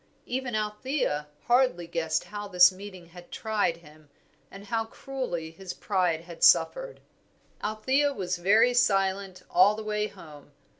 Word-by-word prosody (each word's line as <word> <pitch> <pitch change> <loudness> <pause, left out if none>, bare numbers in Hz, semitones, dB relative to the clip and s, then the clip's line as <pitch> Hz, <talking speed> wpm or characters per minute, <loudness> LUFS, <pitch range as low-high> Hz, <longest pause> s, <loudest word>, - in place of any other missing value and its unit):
Even 250 -2 -3
Althea 210 - -2 0.2
hardly 240 -8 +2
guessed 160 -1 -1
how 205 0 -7
this 180 -1 +6
meeting 185 -2 -11
had 175 0 -14
tried 210 -6 -1
him, 155 -2 -19 0.4
and 195 +1 -12
how 225 +2 -1
cruelly 225 - -5
his 180 +2 -8
pride 180 -5 0
had 170 0 -9
suffered. - - +3 0.6
Althea 260 +7 +1
was 185 -7 -3
very 215 +7 +4
silent 195 -4 +1
all 190 +4 +4
the 220 - -6
way 210 0 -1
home. 145 -6 -14
195 Hz, 140 wpm, -27 LUFS, 175-220 Hz, 0.6 s, this